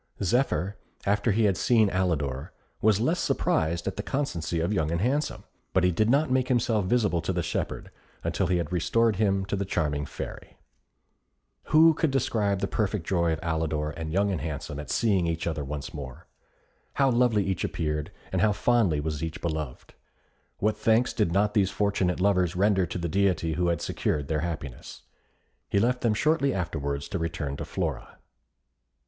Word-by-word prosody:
Zephyr, 100 - +1 0.3
after 105 +3 +2
he 110 +3 +2
had 100 -4 +3
seen 110 -5 +3
Alidor, 75 -8 -1 0.3
was 105 -2 +4
less 160 +10 +1
surprised 85 - 0
at 95 - -3
the - - -1
constancy 90 - -2
of 85 +5 0
Young 80 -6 0
and 85 +1 -1
Handsome; 135 - -1 0.3
but 95 - +3
he 90 - +4
did 110 +6 +1
not 140 +2 +3
make 130 -1 +2
himself 115 -5 +1
visible 100 -5 +2
to 85 - -2
the 90 -1 -1
shepherd - - -3 0.3
until - - 0
he 90 0 +2
had 85 -1 -3
restored 110 +4 +2
him 95 -2 +1
to 100 - -2
the 100 - -1
charming 75 -6 -1
Fairy. - - -8 1.1
Who 160 +1 +6
could 160 0 +1
describe 105 -7 0
the - - 0
perfect 105 -5 -1
joy 85 -3 +1
of 80 - -1
Alidor 80 -2 -1
and 80 -1 -5
Young 100 +3 +2
and 90 - -2
Handsome 75 -2 -5
at 75 - -7
seeing 100 -7 +2
each 85 0 -2
other 80 -3 -2
once 70 0 -6
more? 65 -4 -8 0.7
How 135 -1 +3
lovely 120 -4 +3
each 95 -2 -2
appeared, 75 -2 -2 0.2
and 95 - 0
how 105 +1 +4
fondly 105 -8 +2
was 75 0 -3
each 80 +2 -4
beloved! 80 -6 -4 0.6
What 105 +1 0
thanks 115 +2 +2
did 105 -7 +1
not 105 +3 +2
these 100 -3 +3
fortunate 100 -3 0
lovers 90 -2 +2
render 95 -1 +2
to 85 - -4
the 85 -1 -2
Deity 85 -2 +1
who 90 +2 0
had 85 -2 0
secured 75 -2 -1
their 80 -1 +1
happiness. 75 -6 -6 0.7
He - - +1
left 125 +4 +2
them 115 -3 +2
shortly 150 +2 +2
afterwards 70 -6 -3
to 95 - -2
return 80 -4 -3
to - - -5
Flora. - - -4
95 Hz, 180 wpm, -27 LUFS, 80-110 Hz, 1.1 s, Who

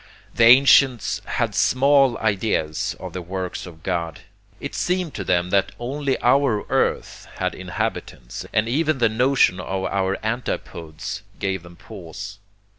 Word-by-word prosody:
The 115 - +4
ancients 130 0 +5
had - - -1
small 135 -1 +3
ideas 100 -7 -1
of - - -8
the 90 - -4
works 90 +1 -5
of 80 -2 -13
God.... 85 -3 -3 0.4
It 140 - -6
seemed 180 -3 -1
to 100 - -4
them 90 0 0
that 100 0 +1
only 135 +3 -2
our 125 -4 +3
earth - - -1
had - - -2
inhabitants, - - -5
and 110 +1 +1
even 155 +4 +1
the 115 -3 +3
notion 125 -4 +2
of 95 +1 -3
our 95 0 -1
antipodes 85 -8 -4 0.2
gave 95 -2 -2
them 85 +1 -14
pause. 95 +2 -9
105 Hz, 140 wpm, -22 LUFS, 90-130 Hz, 0.4 s, ancients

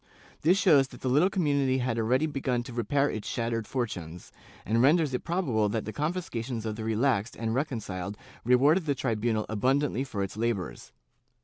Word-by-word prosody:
^ - - -39 0.4
This 175 +5 +4
shows 150 -9 +5
that 125 -3 -14
the - - -2
little 150 +9 +4
community 140 -8 +1
had 125 -3 -1
already 125 +7 +2
begun 130 -5 -1
to 125 -1 -9
repair 140 +5 +1
its 110 -6 -4
shat 115 0 -2
tered 115 -2 -2
fortunes, 90 -10 -4 0.3
and 115 +2 +2
renders 150 +1 +4
it 125 - -2
probable 135 - 0
that 110 +1 -2
the 110 - -5
confiscations 135 -8 -3
of 110 -1 -2
the 110 - -6
relaxed 115 0 0
and 115 -1 -2
reconciled 105 - -3 0.3
rewarded 145 +8 +4
the 140 - +1
tribunal 115 -3 -1
abundantly 130 +4 +1
for 105 -7 -3
its 95 - -5
labors. 105 - -3
125 Hz, 185 wpm, -28 LUFS, 110-140 Hz, 0.4 s, shows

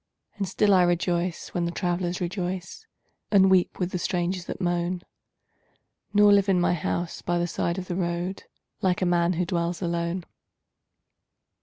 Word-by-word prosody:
And 200 -1 -2
still 200 +2 +3
I 185 - +6
rejoice 175 0 0
when 175 -1 -1
the 170 - -1
travelers 175 0 -1
rejoice 180 - -4 0.4
And 195 -2 +5
weep 185 -2 +3
with 180 -1 -2
the 180 - -2
strangers 175 +1 -1
that - - -6
moan, 175 0 -1 1.1
Nor 205 0 +6
live 200 0 +4
in 185 -2 +4
my 175 - +2
house 175 +1 -2
by 175 - 0
the 175 - +1
side 170 0 -2
of 185 - -4
the 175 - -3
road 175 +1 -2 0.4
Like 185 -2 +1
a - - +2
man 175 0 +2
who 180 +1 0
dwells 170 -1 -1
alone. 170 0 -2
175 Hz, 165 wpm, -26 LUFS, 175-185 Hz, 1.1 s, I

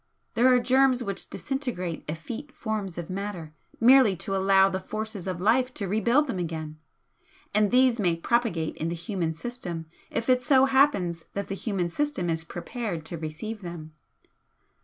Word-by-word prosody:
There 240 +2 +4
are 255 -1 +6
germs 255 0 +3
which 200 -4 -4
disintegrate 240 - -3
effete 225 - -6
forms 215 - -3
of 170 -2 -4
matter 185 -5 -5 0.3
merely 245 -4 +6
to 195 +3 -3
allow 195 0 +5
the 190 -1 -2
forces 215 -1 -5
of 185 -2 -3
life 245 +7 +3
to 200 - -3
rebuild 235 +9 +3
them 235 -10 -3
again 160 -2 -5 0.7
and 210 0 +3
these 250 0 +4
may 175 -5 +2
propagate 170 -4 0
in 160 - -2
the 170 - -2
human 170 -1 -3
system 175 -5 -5 0.2
if 230 0 -3
it 255 -1 +4
so 265 -1 +5
happens 265 - +2
that 200 0 -4
the - - -2
human 195 -4 -2
system 280 - -1
is 165 0 -2
prepared 175 0 -5
to 170 - -5
receive 170 +8 -5
them. 170 -3 -8
200 Hz, 165 wpm, -27 LUFS, 170-245 Hz, 0.7 s, are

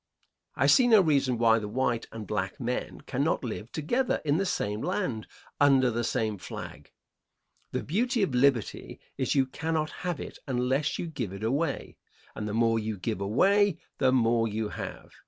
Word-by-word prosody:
I - - +2
see 255 -2 +6
no 225 -3 +7
reason 140 -8 +2
why 115 -1 +4
the 105 - -5
white 120 +1 -1
and 110 -2 -7
black 95 -3 -3
men 125 0 -3
cannot 140 +4 -1
live 115 -1 -5
together 240 - 0
in 145 +1 +2
the 195 +1 0
same 105 -9 -2
land, 180 - -2 0.3
under 135 -3 +5
the 120 +1 -1
same 110 -3 -1
flag. - - -8 0.8
The - - -2
beauty 230 - +1
of 150 - -1
liberty 125 -3 +1 0.2
is - - 0
you 135 -1 +4
cannot 160 +3 -2
have 180 -3 -2
it - - -8
unless 130 +3 0
you - - -3
give 135 - -4
it 100 +2 -7
away, 140 +6 -1 0.4
and 105 - -5
the 105 - -3
more 115 0 +3
you 110 -1 -3
give 105 +1 -3
away 195 - +3 0.2
the 130 -2 +4
more 115 -2 +3
you 110 0 -2
have. - - -7
125 Hz, 175 wpm, -28 LUFS, 110-155 Hz, 0.8 s, no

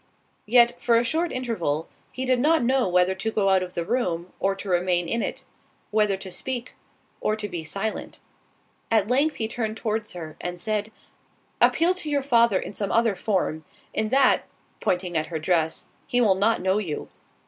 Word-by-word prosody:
Yet, 240 +1 +4
for 240 -1 +3
a 230 - +3
short 325 +7 0
interval, 175 - -2 0.2
he 260 - -4
did 255 -1 +2
not 315 +2 +3
know 260 0 +2
whether 180 +1 +3
to 190 +4 -3
go 205 -3 +1
out 190 -1 +4
of 180 0 -6
the 170 - -2
room, 180 -7 -1
or 195 0 +1
to 200 - -8
remain 175 -1 +1
in 230 +6 0
it; - - -4 0.5
whether 210 -2 +2
to 190 -1 -8
speak, 250 +4 -5 0.5
or 215 - 0
to 210 -1 -5
be 175 -4 -5
silent. 200 +7 -4 0.7
At 220 -2 +2
length 290 +5 +2
he 220 - -2
turned 220 -1 -3
towards 220 -1 -2
her, 160 -3 -8
and 180 0 -4
said, 215 +2 -2 0.7
"Appeal 340 +3 +4
to 360 -5 -6
your 285 -2 +1
father 235 -6 +4
in 195 - -5
some 200 -1 -3
other 230 -2 +3
form—in 190 +2 -2
that 270 +3 +4 0.3
(pointing 180 -1 -1
at 155 -1 0
her 165 - -3
dress) 160 0 0 0.2
he 245 -3 +1
will 220 -5 +5
not 210 +4 +1
know 190 +2 +2
you. 165 -8 -4
210 Hz, 185 wpm, -25 LUFS, 180-240 Hz, 0.7 s, will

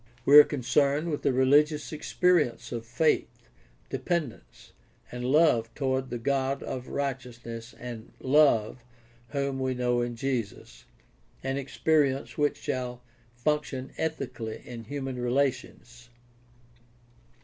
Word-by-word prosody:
We 145 +2 +10
are - - +11
con 145 -3 -4
cerned 140 +5 +2
with 150 - -3
a - - +4
religious 145 +2 +3
experience 155 -5 +1
of 115 -2 -5
faith, 150 +7 0 0.5
dependence, 165 -9 -4 0.4
and 125 0 -5
love 125 -4 +3
toward 130 -2 -1
the 120 - -3
God 135 +2 -1
of 130 -1 -5
righteousness 120 -4 -5
and 120 -2 -8
love, 130 -4 +3 0.4
whom 140 -1 -2
we 130 -1 -1
know 125 -1 +1
in 120 0 -3
Jesus 115 - -4 0.3
— - - -34
an 135 +1 -1
experience 140 0 0
which 145 -1 +1
shall 125 -1 -4 0.3
function 135 0 -2
ethically 125 -8 -4
in 115 -2 -8
human 135 0 -5
relations. 120 -2 -2
130 Hz, 120 wpm, -28 LUFS, 120-145 Hz, 0.5 s, are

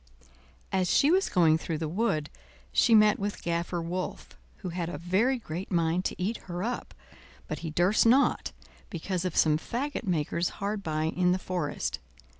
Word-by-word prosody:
As 185 -2 +1
she 290 - +4
was 380 +2 +3
going 160 -3 +4
through 160 -1 -3
the 160 0 -3
wood 155 -4 -1 0.4
she 230 - +5
met 210 -1 +5
with 205 +1 -4
Gaffer 170 +1 -1
Wolf, 180 +2 -4 0.3
who 185 - -6
had 170 -1 -3
a 175 - -5
very 195 - +1
great 180 -5 -6
mind 170 +1 +1
to - - -3
eat 205 +6 -1
her 175 +1 -3
up, 245 +3 -4 0.5
but - - -4
he 165 - -5
durst 180 +8 +3
not, 265 +4 +3 0.4
because 180 +1 -3
of 180 - -2
some 155 -1 +4
fagot 260 - -4
makers 170 0 0
hard 200 +1 -2
by 155 -4 -2
in 180 +3 +2
the - - +1
forest. 180 -5 -3
180 Hz, 175 wpm, -28 LUFS, 165-205 Hz, 0.5 s, she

